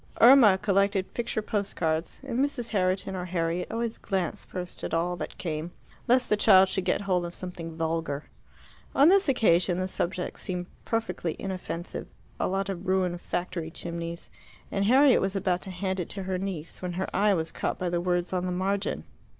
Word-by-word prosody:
Irma 235 -5 +8
collected 195 0 +1
picture 230 -2 -2
post 205 -2 -2
cards, 160 0 -1
and 255 -3 -2
Mrs. 275 -4 0
Herriton 185 -1 0
or 180 -1 -3
Harriet 175 0 -1
always 230 0 -2
glanced 190 -5 -2
first 180 -1 -7
at - - -1
all 175 +2 0
that - - -6
came, 160 -1 -3 0.4
lest 250 +1 +4
the 210 - +3
child 190 -3 +6
should 190 - -1
get - - +1
hold 185 -3 +1
of 175 0 -6
something 170 -3 -7
vulgar. 160 -3 -1 0.7
On 280 +4 +7
this 390 -4 +5
occasion 180 -8 +3
the 185 0 -1
subject 180 -1 -3
seemed 180 -1 -3 0.2
perfectly 225 -7 -2
inoffensive 185 -3 -5 0.3
a - - +1
lot 195 +1 -1
of 190 -1 -5
ruined 185 -2 +1
factory 175 -2 -3
chimneys 170 0 -6 0.4
and 195 0 0
Harriet 265 +4 +6
was 195 +1 -1
about 185 -2 0
to - - -8
hand 190 0 -2
it 175 - -3
to 195 - -4
her 185 -1 -2
niece 180 -5 -5
when 180 -1 -3
her 190 +2 -2
eye 205 0 +4
was 160 -1 -2
caught - - -2
by 180 - -2
the 175 0 0
words 175 0 0
on 180 0 0
the - - -1
margin. 195 +3 -1
185 Hz, 190 wpm, -28 LUFS, 175-200 Hz, 0.7 s, Irma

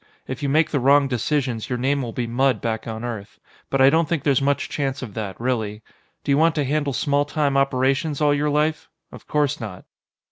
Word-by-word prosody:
If 130 +1 -5
you 140 - -1
make 155 +3 +2
the 145 - +1
wrong 140 +2 +4
decisions, 125 -2 -1
your 125 - -1
name 135 +3 0
will 120 -3 -4
be 120 +1 -3
mud 130 +3 +1
back 110 -1 -3
on 110 0 -5
Earth. 110 -4 -6 0.3
But 135 - +1
I 135 +1 +7
don't 165 +1 +2
think 165 -5 -1
there's 140 -2 +2
much 140 +1 +1
chance 135 -2 -3
of 110 -5 -7
that, 100 -4 -5
really. 110 -4 -2 0.4
Do - - -1
you 140 - +4
want 165 0 +3
to 150 - +1
handle 145 0 0
small 145 +2 +1
time 145 -1 -1
operations 135 +2 +1
all 150 -1 +3
your 145 +1 0
life? 150 +2 0 0.2
Of - - -13
course 145 -1 0
not. 105 -6 -7
135 Hz, 220 wpm, -22 LUFS, 120-145 Hz, 0.4 s, I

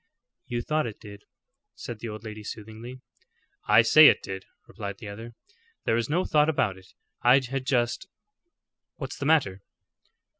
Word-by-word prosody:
"You 120 -1 -3
thought 155 -3 0
it 110 - -8
did," 100 -1 -12 0.5
said 115 -2 -8
the 115 - -6
old 105 0 -8
lady 110 -1 -8
soothingly. 110 +4 -9 0.7
"I 115 - +6
say 150 +7 +8
it - - +4
did," 95 -1 -7 0.2
replied 100 -1 -7
the 105 - -10
other. 115 +3 -9 0.5
"There - - +2
was 115 +2 0
no 175 +5 +1
thought 150 0 +3
about 115 -10 0
it; 95 0 -18 0.3
I 125 +1 +6
had 135 0 -1
just 120 +6 0 0.9
What's - - -7
the 140 - -2
matter?" 100 -12 +2
115 Hz, 160 wpm, -26 LUFS, 105-135 Hz, 0.9 s, say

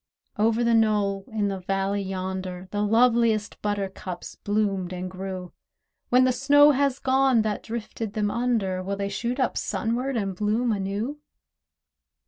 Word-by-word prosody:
Over 225 +2 +3
the 235 0 +3
knoll 205 -3 +2
in 215 -2 -1
the 195 -1 -3
valley 195 +2 -1
yonder 185 -1 -4
The 205 - -1
loveliest 225 0 +2
buttercups 195 -3 -4
bloomed 200 -3 -1
and 185 0 -5
grew; 185 -1 -6 0.6
When 250 +1 +5
the 255 - +4
snow 290 +3 +6
has 280 -1 +1
gone 265 -4 +3
that 215 -1 -2
drifted 225 -2 -5
them 205 -1 0
under, 225 -7 0
Will 195 +2 -3
they 200 0 -2
shoot 235 +6 -3
up 255 - +1
sunward, 245 +3 -1
and 195 -3 -2
bloom 215 +5 +1
anew? 210 +8 -2
210 Hz, 145 wpm, -25 LUFS, 195-235 Hz, 0.6 s, snow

